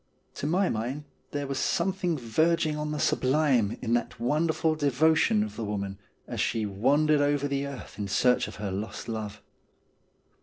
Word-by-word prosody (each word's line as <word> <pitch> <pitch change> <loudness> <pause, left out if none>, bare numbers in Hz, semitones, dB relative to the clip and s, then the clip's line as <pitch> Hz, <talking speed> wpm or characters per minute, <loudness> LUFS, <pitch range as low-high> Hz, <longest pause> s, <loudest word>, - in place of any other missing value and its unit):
To 145 - -2
my 185 +4 +2
mind 125 +5 -2 0.3
there 145 -1 -3
was 135 -1 -3
something 180 -1 0
verging 155 +6 +1
on 150 0 -3
the 150 - -2
sublime 130 -7 +2
in 115 - 0
that 120 - -1
wonderful 155 +5 +1
devotion 155 - +3
of 215 - -6
the 115 - -4
woman 100 -2 -3 0.3
as - - -3
she 115 -2 0
wandered 145 +9 +2
over 145 0 +1
the 140 0 -1
earth 140 -5 -9
in 100 - -2
search 125 +6 +3
of - - -9
her 100 -1 -4
lost 100 +5 -5
love. 110 -3 -5
140 Hz, 165 wpm, -28 LUFS, 115-155 Hz, 0.3 s, devotion